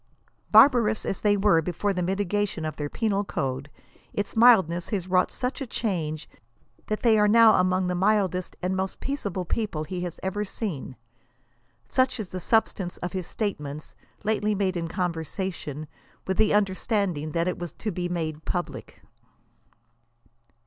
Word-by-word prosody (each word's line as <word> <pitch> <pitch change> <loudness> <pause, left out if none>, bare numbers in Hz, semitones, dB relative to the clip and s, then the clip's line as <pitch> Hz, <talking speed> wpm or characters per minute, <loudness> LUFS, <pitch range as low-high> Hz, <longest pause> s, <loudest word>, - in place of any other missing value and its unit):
Barbarous 230 -6 +6
as 195 - -2
they 205 -1 +3
were 195 -5 +4
before 180 +5 -1
the 180 - -2
mitigation 195 -1 -1
of 155 - -3
their 145 -1 -4
penal 205 0 0
code, 135 -6 -3 0.4
its 205 +2 -3
mildness 190 -8 +5
has 190 -5 -2
wrought 185 0 +2
such 255 +2 -3
a 270 - -3
change 165 -10 -2 0.6
that 215 - -2
they 225 -3 +5
are 210 - +5
now 225 +1 +7
among 185 0 +2
the 180 - 0
mildest 185 -1 +1
and 185 +1 0
most 190 0 -3
peaceable 200 -10 -3
people 205 -7 -2
he 180 +3 -5
has 175 -2 -5
ever 190 +2 -1
seen. 190 - -5 0.9
Such 255 - +1
is 205 -4 -4
the 185 - -5
substance 195 -3 0
of 180 - -4
his 185 -3 -3
statements, 155 -8 -4 0.3
lately 210 0 +1
made 190 -2 0
in 165 -1 -2
con 180 0 -1
versation, 160 -2 -5 0.4
with 190 -1 -1
the 215 - +4
understanding 195 -6 0
that 170 +1 +1
it 180 - -2
was 175 -3 -5
to 215 - -4
be 175 0 -3
maile 160 -3 -3
public. 175 -1 -5
190 Hz, 160 wpm, -26 LUFS, 170-210 Hz, 0.9 s, now